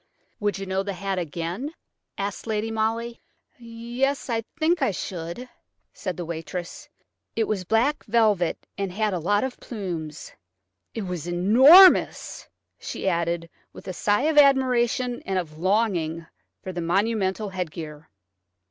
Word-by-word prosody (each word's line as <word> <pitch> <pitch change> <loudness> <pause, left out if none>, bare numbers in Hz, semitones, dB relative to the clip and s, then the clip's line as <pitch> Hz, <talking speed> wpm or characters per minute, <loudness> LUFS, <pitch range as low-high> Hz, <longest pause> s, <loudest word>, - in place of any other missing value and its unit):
"Would 205 -2 0
you 195 - -5
know 190 0 -1
the 200 0 -4
hat 195 0 -3
again?" 175 - -4 0.4
asked 200 +3 -4
Lady 220 0 -1
Molly. 225 +2 -2 0.4
"Yes–I 235 +1 -2 0.2
think 325 +1 +2
I 265 - +3
should," 180 +4 -5 0.5
said 185 -5 -5
the 175 - -4
waitress. 175 - -6 0.5
"It 225 - +2
was 205 -4 -2
black 235 +9 +1
velvet 210 -6 +1
and 195 -2 -2
had 210 +2 0
a 180 - -1
lot 205 +5 +1
of 260 -1 -4
plumes. 170 - -6 0.6
It 225 - -3
was 180 -3 -5
enormous," 255 - +6 0.3
she - - -5
added, 170 -1 0 0.3
with - - -12
a 185 - -3
sigh 205 +6 +1
of 310 -1 +4
admiration 250 -3 +3
and 190 -1 -2
of 155 -4 -4
longing 175 -4 0 0.4
for 190 - -5
the 175 - -3
monumental 200 +3 0
headgear. 160 -4 -6
200 Hz, 140 wpm, -25 LUFS, 175-235 Hz, 0.6 s, enormous